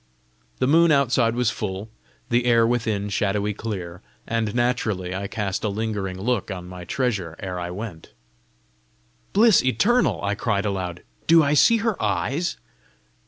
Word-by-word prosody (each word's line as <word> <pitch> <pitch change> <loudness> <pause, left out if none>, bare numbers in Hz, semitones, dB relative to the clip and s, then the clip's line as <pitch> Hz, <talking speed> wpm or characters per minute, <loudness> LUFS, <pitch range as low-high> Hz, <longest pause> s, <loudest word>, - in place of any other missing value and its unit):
The - - +1
moon 165 +4 +5
outside 125 -5 +3
was 120 -2 +1
full, 100 0 -4 0.4
the 120 +1 +2
air 115 -1 +4
within 115 -4 0
shadowy 105 +1 0
clear, 95 -5 -6 0.2
and 115 -2 -1
naturally 110 -7 0
I 100 +1 -3
cast 100 -3 -3
a 105 - +1
lingering 100 -3 -3
look 115 0 -1
on 90 -3 -6
my 90 -1 -9
treasure 95 -8 -2
ere 90 -2 -5
I 90 0 -4
went. 90 -3 -7 1.2
"Bliss 220 0 +5
eternal!" 135 - +2
I 100 0 0
cried 105 -1 -1
aloud, 90 -4 -3 0.2
"do 165 0 +7
I 145 0 +2
see 230 +10 +5
her 225 -4 0
eyes?" 165 +6 -1
110 Hz, 150 wpm, -23 LUFS, 95-125 Hz, 1.2 s, do